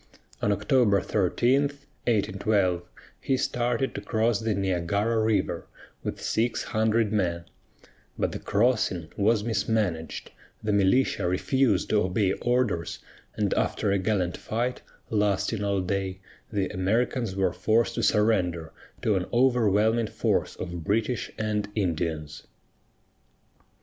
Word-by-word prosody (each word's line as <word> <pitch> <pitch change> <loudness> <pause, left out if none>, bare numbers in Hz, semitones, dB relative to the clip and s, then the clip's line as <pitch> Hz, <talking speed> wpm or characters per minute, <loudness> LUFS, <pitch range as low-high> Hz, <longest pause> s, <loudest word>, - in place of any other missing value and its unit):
On 105 - +2
October 100 +1 +3
13, 120 +9 +2
1812, 110 -10 0 0.4
he 135 - 0
started 125 +1 0
to - - -5
cross 110 +1 +1
the 110 -2 -1
Niagara 100 +4 0
River 110 -1 0 0.3
with - - -4
six 115 +1 0
hundred 110 -1 +1
men; 85 -5 0 0.7
but - - 0
the - - -5
crossing 105 -7 0
was 105 +1 +2
mismanaged, 105 -7 -1 0.3
the 105 -1 0
militia 100 0 +2
refused 130 +9 +1
to 105 - +4
obey 95 +1 +1
orders, 120 -9 0 0.4
and - - 0
after 100 - 0
a 100 - +2
gallant 95 -3 0
fight 120 +3 -2 0.3
lasting 105 0 +1
all 100 -1 +1
day, 95 0 -2 0.3
the 100 -3 0
Americans 110 +3 0
were 95 -2 +1
forced 115 +1 +1
to 115 - -2
surrender 95 -7 +1 0.3
to 110 - +3
an 95 -2 -1
overwhelming 115 -3 +3
force - - -1
of 85 -2 -6
British 110 +6 0
and 105 -1 -1
Indians. 80 -6 -2
105 Hz, 120 wpm, -26 LUFS, 95-115 Hz, 0.7 s, to